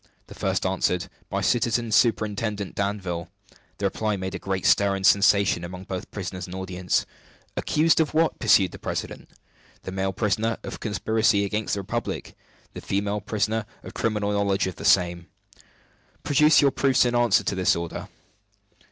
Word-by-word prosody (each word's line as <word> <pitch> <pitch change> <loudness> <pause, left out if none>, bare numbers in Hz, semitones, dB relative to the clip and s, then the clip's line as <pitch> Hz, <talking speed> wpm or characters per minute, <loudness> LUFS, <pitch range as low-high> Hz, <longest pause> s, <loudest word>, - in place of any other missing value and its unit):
The - - -12
first - - -1
answered 90 -1 0 0.2
"By - - -2
Citizen 120 -1 +1
Superintendent 105 -2 +1
Danville." 95 -4 -3 0.5
The 100 - -3
reply 105 +1 -1
made 95 0 -4
a 90 - -4
great 95 0 -3
stir 100 -1 +4
and 95 -1 -3
sensation 100 -3 +4
among 90 +1 -7
both 95 -1 -6
prisoners 95 -2 -6
and 90 - -8
audience. 95 -1 -1 0.5
"Accused 160 +2 +2
of 160 -2 +2
what?" 160 0 +2
pursued 105 -5 +4
the - - -10
president. - - -5 0.5
"The - - -6
male 95 0 -1
prisoner, 110 +3 0
of - - -7
conspiracy 105 0 +1
against 105 +1 -2
the 100 - -3
Republic; 95 - -4 0.4
the - - -8
female 100 +1 -2
prisoner, 110 +1 -1 0.2
of - - -9
criminal 105 -2 -1
knowledge 100 -1 +1
of 95 - -5
the - - -7
same." 85 -2 +3 1.0
"Produce 150 +2 +5
your 140 - +4
proofs 135 -2 +3
in 120 - 0
answer 120 -4 +3
to - - -1
this 95 -1 +2
order." 85 -1 -5
100 Hz, 160 wpm, -25 LUFS, 95-110 Hz, 1.0 s, Produce